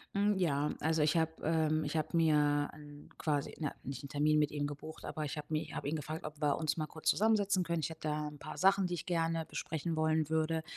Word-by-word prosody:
Hm, 205 Hz, +1 st, +3 dB
ja, 150 Hz, -5 st, +1 dB
also, 160 Hz, 0 st, +1 dB
ich 150 Hz, +2 st, +3 dB
habe, 160 Hz, -1 st, +2 dB
ähm 155 Hz, -1 st, +2 dB
ich 145 Hz, +2 st, -2 dB
habe 155 Hz, +1 st, -2 dB
mir 150 Hz, -3 st, +3 dB
'n 145 Hz, -1 st, -12 dB
quasi, 145 Hz, -2 st, -1 dB
na 150 Hz, -3 st, -1 dB
nicht 135 Hz, +1 st, -6 dB
'n -, -, -6 dB
Termin 150 Hz, +2 st, +3 dB
mit 150 Hz, -1 st, +3 dB
ihm 145 Hz, -1 st, -1 dB
gebucht, 150 Hz, +2 st, -7 dB
aber 155 Hz, -, -3 dB
ich 150 Hz, +1 st, -4 dB
habe 150 Hz, -, -6 dB
mir 155 Hz, 0 st, 0 dB
ich 155 Hz, -, -9 dB
habe -, -, -3 dB
ihn 155 Hz, -, 0 dB
gefragt, 155 Hz, +1 st, -5 dB
ob 150 Hz, 0 st, -8 dB
wir 145 Hz, -2 st, +2 dB
uns 155 Hz, -2 st, 0 dB
mal 155 Hz, -2 st, -1 dB
kurz 160 Hz, +1 st, -5 dB
zusammensetzen 200 Hz, 0 st, +3 dB
können. 170 Hz, -1 st, -1 dB
Ich -, -, -1 dB
hätte 160 Hz, -1 st, -5 dB
da 150 Hz, 0 st, -1 dB
'n 150 Hz, -, -10 dB
paar 145 Hz, -, -8 dB
Sachen, 195 Hz, +2 st, +4 dB
die 180 Hz, -, -4 dB
ich 175 Hz, -, -3 dB
gerne 165 Hz, -2 st, 0 dB
besprechen 160 Hz, +1 st, -3 dB
wollen 155 Hz, -1 st, +2 dB
würde 160 Hz, 0 st, +1 dB
155 Hz, 250 wpm, -34 LUFS, 150-165 Hz, -, Sachen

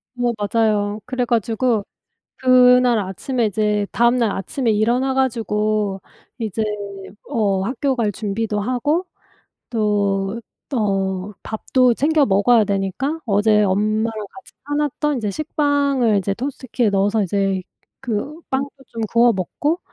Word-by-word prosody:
어 245 Hz, -1 st, 0 dB
맞아요. 210 Hz, -1 st, 0 dB
그래 255 Hz, -1 st, -1 dB
가지고 230 Hz, -1 st, +1 dB, 0.5 s
그날 250 Hz, -2 st, +5 dB
아침에 220 Hz, +5 st, -2 dB
이제 210 Hz, 0 st, 0 dB
다음날 235 Hz, -2 st, +3 dB
아침에 230 Hz, +5 st, -2 dB
일어나 240 Hz, +5 st, +1 dB
가지고 215 Hz, -6 st, 0 dB, 0.4 s
이제 220 Hz, -2 st, -2 dB, 0.7 s
어 200 Hz, -7 st, +1 dB
학교 260 Hz, +5 st, -1 dB
갈 215 Hz, -4 st, 0 dB
준비도 210 Hz, 0 st, -2 dB
하고 290 Hz, -, 0 dB, 0.6 s
또 205 Hz, -2 st, 0 dB, 0.3 s
어 195 Hz, -4 st, -1 dB
밥도 245 Hz, +2 st, +1 dB
챙겨 295 Hz, +1 st, +2 dB
먹어야 215 Hz, +4 st, +4 dB
되니까 200 Hz, -, -2 dB
어제 210 Hz, 0 st, +3 dB
엄마랑 215 Hz, +3 st, +1 dB, 0.2 s
같이 255 Hz, -, -15 dB, 0.2 s
사 290 Hz, -, -2 dB
놨던 295 Hz, -1 st, 0 dB
이제 210 Hz, -3 st, -2 dB
식빵을 285 Hz, -, +1 dB
이제 195 Hz, +1 st, -2 dB
토스트기에 250 Hz, -4 st, -2 dB
넣어서 200 Hz, +2 st, +2 dB
이제 195 Hz, 0 st, 0 dB, 0.4 s
그 265 Hz, +5 st, -3 dB
빵도 270 Hz, +1 st, 0 dB, 0.2 s
좀 230 Hz, -1 st, -7 dB
구워 235 Hz, 0 st, +5 dB
먹고 290 Hz, -, -1 dB
225 Hz, 260 characters per minute, -20 LUFS, 205-255 Hz, 0.7 s, 그날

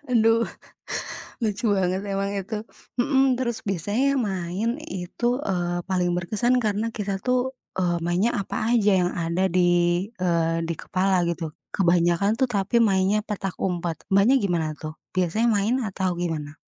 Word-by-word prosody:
Aduh, 230 Hz, -1 st, +4 dB, 1.0 s
lucu 220 Hz, +1 st, 0 dB
banget 185 Hz, -1 st, +1 dB
emang 195 Hz, 0 st, -1 dB
itu. 200 Hz, +3 st, -5 dB, 0.5 s
Mhm, 270 Hz, 0 st, +3 dB
terus 240 Hz, -2 st, -2 dB
biasanya 205 Hz, -, +1 dB
main 200 Hz, -, -1 dB
itu, 190 Hz, -, -4 dB, 0.2 s
eee, 175 Hz, -4 st, -1 dB
paling 180 Hz, -1 st, +1 dB
berkesan 215 Hz, +8 st, +1 dB
karena 215 Hz, 0 st, 0 dB
kita 200 Hz, -2 st, -2 dB
tuh, 250 Hz, +4 st, 0 dB, 0.3 s
eee, 175 Hz, -2 st, +1 dB
mainnya 180 Hz, +7 st, +2 dB
apa 195 Hz, -, -4 dB, 0.2 s
aja 210 Hz, -3 st, +4 dB
yang 175 Hz, -, +1 dB
ada 170 Hz, +1 st, -1 dB
di, 175 Hz, 0 st, +3 dB, 0.2 s
eee, 165 Hz, -2 st, +2 dB
di 165 Hz, 0 st, -2 dB
kepala 185 Hz, -1 st, +1 dB
gitu. 170 Hz, -2 st, -2 dB, 0.2 s
Kebanyakan 175 Hz, +3 st, +2 dB
tuh 260 Hz, -, +3 dB
tapi 215 Hz, 0 st, +1 dB
mainnya 200 Hz, -2 st, +3 dB
petak 195 Hz, -3 st, -4 dB
umpet. 175 Hz, -3 st, -1 dB
Mbaknya 200 Hz, +6 st, +5 dB
gimana 175 Hz, -8 st, 0 dB
tuh? 155 Hz, 0 st, -6 dB, 0.2 s
Biasanya 185 Hz, +5 st, +1 dB
main 210 Hz, +2 st, +2 dB
atau 190 Hz, -4 st, -1 dB
gimana? 155 Hz, -4 st, -4 dB
190 Hz, 145 wpm, -24 LUFS, 175-220 Hz, 1.0 s, Mbaknya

